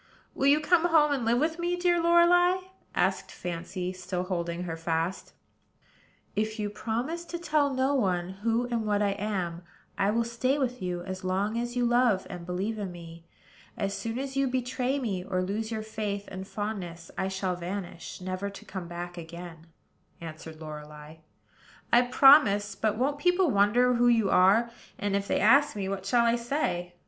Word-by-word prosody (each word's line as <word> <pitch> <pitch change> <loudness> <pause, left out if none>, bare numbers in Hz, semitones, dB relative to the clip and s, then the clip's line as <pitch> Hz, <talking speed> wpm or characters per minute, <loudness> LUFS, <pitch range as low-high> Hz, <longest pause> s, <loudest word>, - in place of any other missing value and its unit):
"Will 275 - +1
you 290 +2 +6
come 335 +2 +3
home 315 -3 +4
and 270 -5 0
live 235 +1 +3
with 320 +5 0
me, 350 +1 0
dear 350 -1 +2
Lorelei?" 345 +2 +5 0.4
asked - - 0
Fancy, 180 +1 -5
still 180 0 -4
holding 175 -2 -3
her 165 -2 -4
fast. 165 +2 -2 1.0
"If 215 +1 -1
you 210 -1 -2
will - - -13
promise 245 +11 -3
to 345 - -5
tell 305 -4 +1
no 265 +1 +1
one 185 -9 0
who 230 +2 +1
and 235 -2 -1
what 205 0 +2
I 200 - +2
am, 190 -4 -3 0.4
I 195 - +3
will 230 +2 +2
stay 235 +4 0
with 250 -4 -2
you 180 -1 -3
as 185 0 -6
long 195 +4 0
as 240 +1 -4
you 245 -1 +1
love 240 -5 +3
and 175 -1 -8
believe 195 +5 -2
in 195 -3 -4
me. 170 -1 -11 0.5
As 200 -1 -2
soon 230 0 -4
as 270 0 -4
you 275 0 +2
betray 255 +1 -1
me, 205 -9 -2
or 185 0 -1
lose 210 +4 -3
your 220 -1 -3
faith 210 -2 -4
and 190 0 -7
fondness, 185 -6 -5
I 190 - -1
shall 190 -1 -2
vanish, 180 0 -6
never 185 +2 -3
to 200 - -12
come 185 -3 -6
back 175 +1 -6
again," 170 0 -10 0.5
answered 160 -1 -9
Lorelei. 150 0 -9 0.8
"I 240 - +8
promise: 245 -5 +5
but 215 -1 -1
won't 280 +4 0
people 355 -1 +3
wonder 235 +5 +4
who 245 0 +3
you 225 -5 +3
are? 205 +6 +4 0.3
and, 200 -1 -1
if 200 0 -1
they - - +1
ask 275 +5 +5
me, 195 -2 -3
what 195 0 -4
shall 235 +3 +3
I 235 +1 +3
say?" 180 - -2
205 Hz, 185 wpm, -28 LUFS, 180-250 Hz, 1.0 s, I